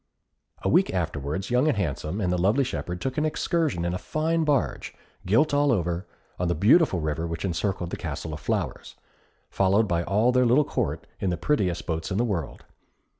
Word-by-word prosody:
A - - 0
week - - +3
afterwards, 75 - -3
Young 125 +4 +3
and 145 -8 +2
Handsome 85 0 -2
and 90 -2 +1
the - - +1
lovely 105 +10 +3
shepherd 90 -8 -4
took 130 +6 -2
an - - +1
excursion 155 - 0
in 85 - -1
a 90 - -3
fine 160 +1 0
barge, 145 -4 -1 0.3
gilt 130 +11 +3
all 145 0 +3
over, 90 -3 -1 0.3
on 90 - 0
the 85 - +1
beautiful 105 - +4
river 80 +1 -2
which 85 +3 -4
encircled 90 0 -2
the - - -3
Castle 80 - -5
of 75 - -6
Flowers, - - -3 0.6
followed 100 +3 +3
by 85 -3 +1
all 105 +7 +2
their 125 0 +3
little 135 +5 +4
Court - - -2
in 95 - 0
the 85 - -1
prettiest 90 - 0
boats 80 -1 -3
in 95 - -2
the 120 - +2
world. 90 - -4
95 Hz, 195 wpm, -26 LUFS, 85-130 Hz, 0.6 s, beautiful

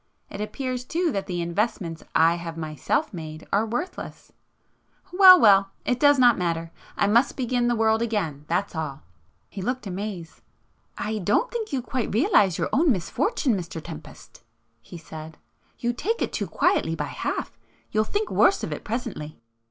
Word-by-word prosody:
It 200 - -6
appears 255 +3 -3
too 330 +5 -1
that 195 -5 -3
the 175 -2 -2
investments 170 -2 -2
I 165 +1 +5
have 170 -1 -6
myself 155 - -2
made 155 -2 -8
are 210 +3 +2
worthless;—well, 365 - +2
well!—it 200 +3 +3
does 290 -1 +5
not 245 -4 +5
matter,—I 165 +2 -3
must 230 +6 +3
begin 245 -1 0
the 240 - +2
world 220 0 +2
again, 180 -11 -2
that's 180 +5 -1
all!" 150 -3 -4 0.4
He 195 - -8
looked 250 +5 -3
amazed. 190 -3 -6 0.6
"I 215 0 -2
don't 210 - +1
think 450 -5 -4
you 265 -3 -1
quite 255 -1 -3
realize 215 - +3
your - - -1
own 305 +2 +4
misfortune, 245 - 0
Mr 175 -3 -5
Tempest"—he 115 -5 -13
said—"You 160 +9 -8
take 445 - -2
it - - -4
too - - -2
quietly - - +1
by - - -3
half. - - -4 0.4
You'll 215 0 +2
think 415 - -2
worse - - +3
of - - -3
it - - -7
presently." 210 -10 -5
205 Hz, 150 wpm, -25 LUFS, 165-250 Hz, 0.6 s, I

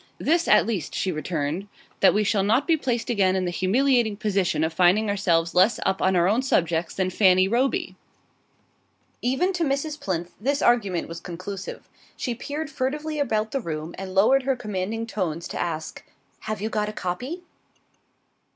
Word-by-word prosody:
"This 335 +2 +1
at - - +5
least," 205 -9 -3
she 190 - 0
returned; 155 +3 -3 0.3
"that 195 - +6
we 210 - +3
shall 205 -1 +1
not 220 +8 +2
be 330 - +3
placed 245 -6 -2
again 190 -4 +2
in 185 -1 0
the 175 - -1
humiliating 230 +3 +2
position 195 -6 0
of 160 0 -1
finding 185 +5 +3
ourselves 170 -5 +1
less 185 +6 +4
up 190 0 0
on 190 0 +2
our 175 0 +3
own 220 +6 +2
subjects 170 -9 0
than 185 -1 0
Fanny 185 -1 +4
Roby!" 245 +6 0 1.3
Even 265 +10 +1
to 350 -2 -1
Mrs. 290 +1 -2
Plinth 175 -6 -3
this 280 +5 +1
argument 205 - +2
was 165 0 -7
conclusive. 185 +3 -7 0.3
She 245 - -2
peered 290 +6 -5
furtively 300 +4 -2
about 220 -6 0
the 275 - -1
room 155 -2 -5
and 190 0 -7
lowered 225 +8 +5
her 265 0 0
commanding 215 0 -3
tones 170 -7 -3
to - - -3
ask: 160 -2 -4 0.4
"Have 215 -2 -5
you 215 - -1
got 210 -1 -1
a - - -7
copy?" 250 - -4
205 Hz, 175 wpm, -24 LUFS, 180-255 Hz, 1.3 s, that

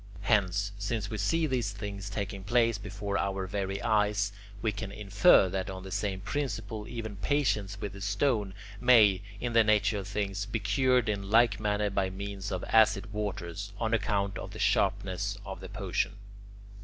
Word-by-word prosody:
Hence, 100 -1 +1
since 105 0 -2
we 110 - -3
see 160 +11 +1
these 125 -7 0
things 100 -1 -6
taking 100 -1 -4
place 115 +1 +2
before 100 0 -3
our 95 -1 -1
very 95 0 -3
eyes, 105 -1 +2 0.3
we 110 +1 0
can 100 -1 -6
infer 100 -1 +5
that 95 0 -3
on 95 -1 -6
the 95 - -8
same 95 -1 -2
principle 110 -4 -3
even 110 -4 -6
patients 105 -6 0
with 100 -2 -5
the 100 - -10
stone 105 -1 0 0.2
may, 110 -6 +6 0.2
in 120 +1 -2
the 115 -1 +6
nature 105 0 +2
of 95 - -7
things, 100 -1 -2
be 110 - -1
cured 120 +4 +2
in 100 -2 -2
like 110 -2 +4
manner 105 -1 0
by 95 -1 0
means 100 +1 -5
of 95 -1 -3
acid 105 -1 +3
waters, 100 -1 -4
on 110 0 -1
account 100 -2 0
of - - -6
the - - -8
sharpness 95 +2 +1
of 95 0 -6
the 95 0 -9
potion. 100 -1 -1
100 Hz, 175 wpm, -29 LUFS, 100-110 Hz, 0.3 s, may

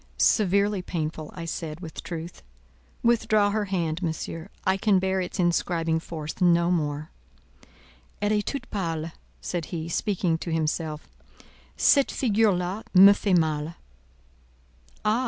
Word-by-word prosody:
"Severely 200 -1 +3
painful," 155 -3 -4
I 170 - -6
said, 160 -1 -5
with 165 -3 -8
truth. 165 0 -7 0.6
"Withdraw 220 -3 +3
her 215 0 0
hand, 175 -4 -2
Monsieur; 165 +1 -4 0.2
I 190 0 +3
can 195 0 +3
bear 190 0 0
its 180 - -5
inscribing 170 -2 +1
force 160 0 -7
no 170 -1 +4
more." 150 -2 -2 1.1
"Elle 205 0 0
est 210 -1 +1
toute 280 - -3
pâle," 165 -5 -2 0.3
said 175 -3 -3
he, 165 -2 -5
speaking 175 -2 0
to 170 - -5
himself; 155 -1 -2 0.7
"cette 280 -2 +4
figure 220 -3 +2
là 180 +3 -2
me 195 +2 +10
fait 200 -2 +2
mal." 155 0 -1 1.3
"Ah! 215 +3 +3
175 Hz, 135 wpm, -26 LUFS, 160-200 Hz, 1.3 s, me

